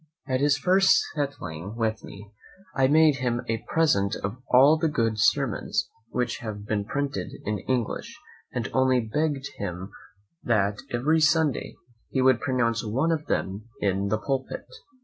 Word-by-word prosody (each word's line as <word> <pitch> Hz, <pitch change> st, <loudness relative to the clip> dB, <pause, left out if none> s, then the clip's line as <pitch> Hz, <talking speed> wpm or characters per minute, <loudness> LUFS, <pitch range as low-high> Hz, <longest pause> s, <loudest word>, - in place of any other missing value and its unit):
At 130 Hz, -1 st, -1 dB
his 145 Hz, 0 st, +3 dB
first 190 Hz, +5 st, +4 dB
settling 100 Hz, -, -4 dB
with 110 Hz, -1 st, -1 dB
me, 100 Hz, +1 st, -11 dB, 0.4 s
I 130 Hz, 0 st, +4 dB
made 155 Hz, 0 st, +5 dB
him 120 Hz, -2 st, -1 dB
a 115 Hz, 0 st, -2 dB
present 100 Hz, -12 st, +2 dB
of 100 Hz, +5 st, -3 dB
all 135 Hz, +5 st, +7 dB
the 160 Hz, +1 st, 0 dB
good 115 Hz, -7 st, 0 dB
sermons 105 Hz, +1 st, +1 dB, 0.2 s
which 125 Hz, -1 st, -2 dB
have 105 Hz, -2 st, -6 dB
been 105 Hz, -1 st, -1 dB
printed 135 Hz, -6 st, -3 dB
in 105 Hz, -1 st, -1 dB
English, 125 Hz, -4 st, -2 dB, 0.3 s
and 120 Hz, -4 st, -2 dB
only 130 Hz, -1 st, +3 dB
begg'd 140 Hz, +4 st, -1 dB
of -, -, -19 dB
him 95 Hz, -1 st, -5 dB, 0.5 s
that 100 Hz, -5 st, +1 dB
every 150 Hz, +7 st, +2 dB
Sunday 155 Hz, -2 st, +2 dB, 0.3 s
he 130 Hz, -, -1 dB
would 130 Hz, -3 st, +4 dB
pronounce 120 Hz, -4 st, 0 dB
one 130 Hz, +10 st, 0 dB
of 160 Hz, -2 st, -2 dB
them 100 Hz, +3 st, -2 dB
in 100 Hz, 0 st, 0 dB
the 110 Hz, +2 st, +1 dB
pulpit. 135 Hz, +3 st, -3 dB
120 Hz, 155 wpm, -26 LUFS, 105-145 Hz, 0.5 s, all